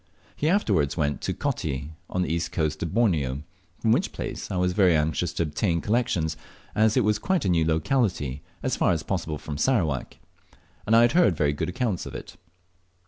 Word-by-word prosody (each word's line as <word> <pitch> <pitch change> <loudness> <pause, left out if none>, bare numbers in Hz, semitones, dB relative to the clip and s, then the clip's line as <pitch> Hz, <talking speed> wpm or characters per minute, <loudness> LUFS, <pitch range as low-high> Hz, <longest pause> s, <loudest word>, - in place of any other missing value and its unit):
He 155 - 0
afterwards 100 - +2
went 75 -3 0
to - - -1
Coti 70 +3 -3 0.2
on 90 - 0
the 80 - -1
east 85 0 -2
coast 75 -3 -1
of 85 - -2
Borneo, 80 - +1 0.3
from 110 - +1
which 150 - +2
place - - -5
I 95 - -2
was 90 0 +1
very 90 -4 +4
anxious 80 +2 0
to - - 0
obtain 85 +3 0
collections, 90 -7 0 0.4
as 110 +2 +3
it 125 - +3
is 105 0 +2
a - - -19
quite 190 - +1
new 85 -3 +3
locality 80 - 0 0.2
as 130 -2 0
far - - +2
as 80 - -2
possible 80 -5 -2
from 75 -1 -6
Sarawak, 80 - 0 0.7
and 110 - +4
I 115 - +7
had 120 - +4
heard 135 - +4
very 75 -1 +2
good 75 - -2
accounts 100 -1 -2
of - - -8
it. - - -8
90 Hz, 195 wpm, -26 LUFS, 75-110 Hz, 0.7 s, I